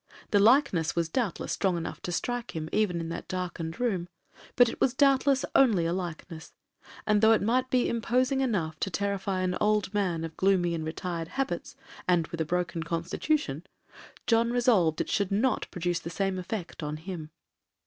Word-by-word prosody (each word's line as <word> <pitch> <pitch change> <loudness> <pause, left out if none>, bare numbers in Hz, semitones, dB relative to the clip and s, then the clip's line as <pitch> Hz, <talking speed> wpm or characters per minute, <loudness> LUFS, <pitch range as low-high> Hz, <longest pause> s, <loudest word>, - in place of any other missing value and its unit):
The 205 - +5
likeness 210 - +4
was 170 -1 0
doubtless 220 0 -2
strong 190 -3 +1
enough 165 - -5
to 175 - -4
strike 245 +5 -3
him 160 -1 -4
even 205 -5 +1
in 165 0 -4
that 170 - -6
darkened 175 -3 -4
room, 195 -8 0 0.5
but 245 -1 +6
it - - -6
was 260 - +2
doubtless 275 -1 +3
only 215 -11 +4
a 165 - 0
likeness; 170 -2 -6 0.5
and 210 -1 +3
though 220 0 +7
it 220 - +2
might 250 +4 +1
be 250 -1 +2
imposing 255 +4 +1
enough 175 -11 -1
to - - -1
terrify 200 -1 -1
an 180 -1 0
old 210 -2 +1
man 180 -6 0
of 160 -1 -6
gloomy 185 -3 +2
and 160 -1 -3
retired 165 0 -4
habits, 270 +8 -3 0.3
and 175 -2 +3
with 170 -1 -4
a - - 0
broken 175 0 -1
constitution, 165 - -1 0.6
John 230 0 +3
resolved 225 -10 +3
it - - -4
should 200 -3 +1
not 220 +4 +1
produce 175 -1 -1
the 170 - -7
same 195 +1 -1
effect 185 -1 -5
on 150 0 -3
him. 160 -2 -7
185 Hz, 180 wpm, -28 LUFS, 170-230 Hz, 0.6 s, though